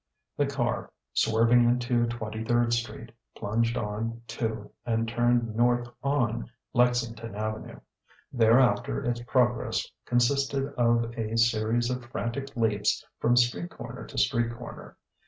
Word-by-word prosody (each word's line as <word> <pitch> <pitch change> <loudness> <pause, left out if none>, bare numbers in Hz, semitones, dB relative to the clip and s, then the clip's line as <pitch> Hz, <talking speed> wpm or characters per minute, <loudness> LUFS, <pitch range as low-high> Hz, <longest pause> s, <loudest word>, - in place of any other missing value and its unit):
The 145 - +1
car, 125 -4 -2 0.2
swerving 115 +2 +4
into 120 0 +2
Twenty 110 -2 -4
third 120 +1 +2
Street, 115 -1 -3 0.3
plunged 115 +3 0
on 115 +1 -3
to 110 -1 -3
and 115 -1 0
turned 120 -1 +1
north 120 +1 +2
on 125 - 0 0.2
Lexington 120 -3 +1
Avenue. 110 +1 -4 0.5
Thereafter 120 - +3
its 120 0 -1
progress 120 0 +1 0.2
consisted 135 +3 +1
of 115 -1 +2
a 110 0 -2
series 115 +1 +2
of 125 -1 -3
frantic 120 +3 -4
leaps 105 -3 +1
from 120 +1 +3
street 120 -8 +2
corner - - -9
to - - -10
street 120 0 +2
corner. 120 0 -10
120 Hz, 125 wpm, -28 LUFS, 115-120 Hz, 0.5 s, swerving